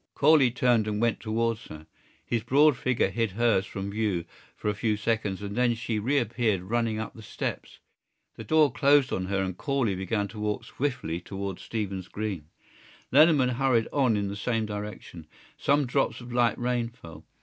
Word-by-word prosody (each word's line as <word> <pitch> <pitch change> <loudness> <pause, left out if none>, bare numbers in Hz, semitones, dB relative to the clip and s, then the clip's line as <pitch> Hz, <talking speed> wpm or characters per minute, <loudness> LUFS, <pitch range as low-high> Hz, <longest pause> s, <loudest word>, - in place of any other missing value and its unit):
Corley 145 -3 +5
turned 120 -2 +2
and 105 -1 -1
went 115 0 +1
towards 115 0 -1
her. 75 0 -11 0.4
His 115 -2 -1
broad 140 +5 +4
figure 125 -1 0
hid 115 -4 -1
hers 110 -3 +2
from 100 +1 -5
view 100 -5 -1 0.3
for - - -5
a 105 - +2
few 105 +1 0
seconds 105 -2 -1
and 100 0 -5
then 120 -1 +2
she 115 -1 -2
reappeared 115 -4 0
running 115 +2 -1
up 110 0 -5
the 110 - -12
steps. 105 - -5 0.6
The - - -8
door 155 -3 +4
closed 140 0 +3
on 95 0 -2
her 95 0 0
and 95 -1 -3
Corley 135 -3 0
began 100 +2 -1
to 110 - -9
walk 105 0 -2
swiftly 120 - -3
towards 95 0 -5
Stephen's 100 -5 -4
Green. 100 -8 -4 0.6
Lenehan 145 -2 +5
hurried 130 -4 +2
on 130 -7 +3
in 100 -1 -1
the 100 - -4
same 110 +1 -1
direction. 105 -6 -7 0.3
Some 145 0 +2
drops 135 +2 0
of 120 -1 -9
light 120 -1 +2
rain 120 -1 -1
fell. 85 -10 -13
115 Hz, 180 wpm, -27 LUFS, 100-125 Hz, 0.6 s, Corley